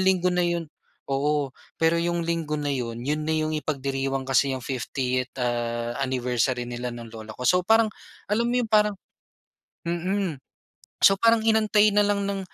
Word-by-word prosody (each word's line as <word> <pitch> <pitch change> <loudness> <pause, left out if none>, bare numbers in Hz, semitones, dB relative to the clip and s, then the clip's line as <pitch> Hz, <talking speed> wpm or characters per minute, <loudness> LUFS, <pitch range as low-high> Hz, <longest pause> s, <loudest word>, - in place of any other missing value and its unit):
linggo 185 -1 +3
na 180 0 +2
'yon 170 -1 -1 0.4
oo, 140 0 0 0.2
pero 165 +1 +2
'yong 170 0 -1
linggo 165 -2 -1
na 145 -1 -1
'yon, 120 -4 -3
'yon 150 +2 -1
na 160 - +2
'yong 155 0 0
ipagdiriwang 135 -2 -2
kasi 135 +1 +2
'yong 125 - -8
50th, 130 -1 -2
ah, 120 0 -2
anniversary 125 -1 0
nila 120 0 -4
ng 115 -1 -9
lola 110 -1 -9
ko. 125 - -6
So 180 +8 +4
parang, 220 +1 +4 0.4
alam 230 +3 +1
mo 245 - +1
'yon, 245 -2 0
parang 210 -1 +4 0.9
mm, 175 -2 -1 0.6
so 195 - +8
parang 230 -1 +4
inantay 215 -1 +4
na 210 - +4
lang 200 -1 +1
ng 195 -1 -2
150 Hz, 165 wpm, -25 LUFS, 125-190 Hz, 0.9 s, so